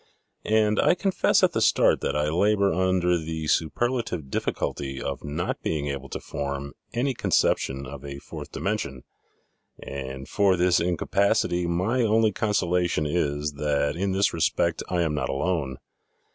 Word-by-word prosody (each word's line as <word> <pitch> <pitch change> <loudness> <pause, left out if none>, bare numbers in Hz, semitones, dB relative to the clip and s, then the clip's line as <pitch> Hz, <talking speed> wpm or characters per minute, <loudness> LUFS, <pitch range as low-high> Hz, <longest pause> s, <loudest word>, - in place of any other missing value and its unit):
And 105 -1 +3
I - - +4
confess 190 0 +2
at - - +5
the - - -1
start - - +4
that 70 - -1
I 75 0 +1
labor 100 +4 +2
under 90 -1 +2
the 80 0 -4
superlative 90 - -1
difficulty 70 -1 -2
of - - -4
not 80 +5 -3
being 75 -2 -2
able 70 -1 -5
to - - -4
form 70 0 -5 0.2
any 130 +3 0
conception 70 - +1
of 70 +1 -9
a 70 -1 -6
fourth - - -9
dimension, 85 -11 -3 0.7
and 65 -1 -7
for 100 -3 +3
this 90 +1 +3
incapac 90 +3 +1
ity 90 0 -1
my 95 +9 +1
only 110 -1 +3
consolation 90 -6 0
is, 75 -2 -1
that 70 0 0
in 95 +3 -1
this 95 +1 +2
respect 80 -2 +1
I 90 -1 +1
am 80 -2 0
not 75 - -2
alone. 70 -3 -1
85 Hz, 155 wpm, -25 LUFS, 70-100 Hz, 0.7 s, at